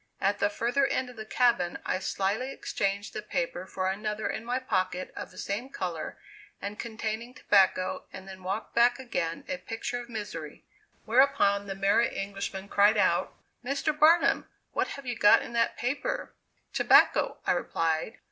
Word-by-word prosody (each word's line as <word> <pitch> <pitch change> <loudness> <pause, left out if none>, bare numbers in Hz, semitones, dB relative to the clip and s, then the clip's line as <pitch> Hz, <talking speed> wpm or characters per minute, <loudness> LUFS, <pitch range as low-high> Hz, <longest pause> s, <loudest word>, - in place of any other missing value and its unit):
At 200 +1 +1
the - - +3
further 245 +6 +1
end 255 -1 -1
of - - -16
the 220 -1 -8
cabin 230 -5 +2
I - - 0
slyly 200 +7 -1
exchanged 200 -4 -2
the - - -4
paper 210 -4 -3
for 185 0 -2
another 210 +2 -2
in - - -3
my 245 +2 -1
pocket 185 -7 -1
of - - -6
the - - -17
same 215 +7 -3
color 175 - -4 0.4
and 205 +2 -6
containing 225 +1 -4
tobacco 190 -2 +2
and 190 0 -10
then 190 -1 -10
walked 195 +4 -4
back 240 +1 +4
again 175 -11 -3
a 185 - -2
picture 230 +5 -4
of 240 - -12
misery. 185 -9 -6 0.4
Whereupon, 215 -5 +3
the 195 - -4
Merry 200 +4 +3
Englishman 195 0 -4
cried 205 +2 +4
out: - - +2 0.3
"Mr. 280 +4 0
Barnum, 315 +3 +4 0.2
what - - 0
have 275 - -8
you 245 -1 -2
got 205 -2 +6
in - - -9
that 230 0 +1
paper?" 250 +4 -2 0.4
"Tobacco," - - +4
I - - +3
replied. 165 +7 -1
210 Hz, 165 wpm, -28 LUFS, 195-245 Hz, 0.4 s, got